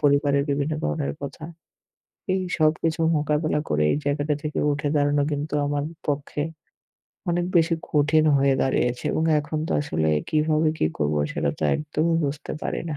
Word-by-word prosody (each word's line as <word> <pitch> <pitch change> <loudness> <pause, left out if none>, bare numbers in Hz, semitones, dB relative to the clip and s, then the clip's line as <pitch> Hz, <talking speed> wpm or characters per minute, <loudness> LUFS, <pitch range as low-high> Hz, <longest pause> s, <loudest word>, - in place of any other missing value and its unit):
পরিবারের 140 -1 +3
বিভিন্ন 140 +2 0
ধরনের 150 -3 -1
কথা। 145 +2 -6 0.9
এই 190 - 0 0.2
সবকিছু 160 +1 +1 0.2
মোকাবিলা 150 +1 0
করে 75 0 +2
এই - - +1
জায়গাটা 145 +1 0
থেকে 150 0 -2
উঠে 145 +1 -2
দাঁড়ানো 145 0 +2
কিন্তু 145 +1 -3
আমার 145 0 -1 0.2
পক্ষে 145 0 -2 0.9
অনেক 175 0 +1
বেশি 165 0 +4 0.2
কঠিন 150 +1 +3
হয়ে 135 0 +3
দাঁড়িয়েছে। 125 -2 0
এবং 160 - 0 0.2
এখন 150 +1 -4
তো - - 0
আসলে 80 - -1 0.2
কিভাবে 155 0 +2
কি - - +2
করবো, 75 0 +1
সেটা - - 0
তো - - -6
একদমই 155 +2 0
বুঝতে 145 +1 -4
পারি - - -2
না। 150 - -3
150 Hz, 155 wpm, -24 LUFS, 140-155 Hz, 0.9 s, বেশি